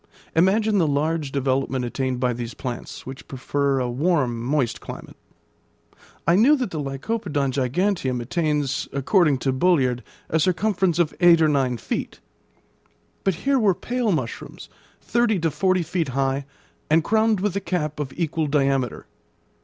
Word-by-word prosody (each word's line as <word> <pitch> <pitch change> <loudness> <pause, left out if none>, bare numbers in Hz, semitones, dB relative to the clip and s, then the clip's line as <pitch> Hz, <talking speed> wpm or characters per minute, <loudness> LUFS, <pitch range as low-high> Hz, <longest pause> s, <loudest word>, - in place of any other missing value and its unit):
Imagine 205 +5 +3
the 165 - +3
large 150 0 0
development 135 -1 0
attained 130 +1 -2
by 125 -1 +1
these 120 0 -6
plants, 125 -2 -6
which 130 +1 -9
prefer 140 +1 -1
a 125 - 0
warm, 130 -3 0
moist 130 -2 0
climate. - - -9 1.1
I 170 - +4
knew 250 +10 +6
that 250 -8 -3
the 155 - -3
Lycopodon 145 0 -2
giganteum 135 +1 0
attains, 145 +1 -1
according 145 +1 +3
to 135 +1 0
Bulliard, 130 -5 +2 0.3
a 160 - +1
circumference 185 0 +1
of 170 -3 +1
eight 175 -2 +6
or 160 - +4
nine 135 -4 +1
feet; - - -4 1.0
but 195 -3 +1
here 275 -1 +3
were 200 -5 +3
pale 245 0 -1
mushrooms, 130 -9 -4 0.3
thirty 235 -3 +1
to 165 -2 0
forty 185 +2 +1
feet 170 -1 -1
high, 135 +1 -1 0.4
and 160 +1 +4
crowned 220 +1 +2
with 200 -1 -1
a 200 - -1
cap 155 -6 -2
of 140 -3 -3
equal 160 -2 -1
diameter. 135 -3 0
150 Hz, 150 wpm, -23 LUFS, 135-185 Hz, 1.1 s, knew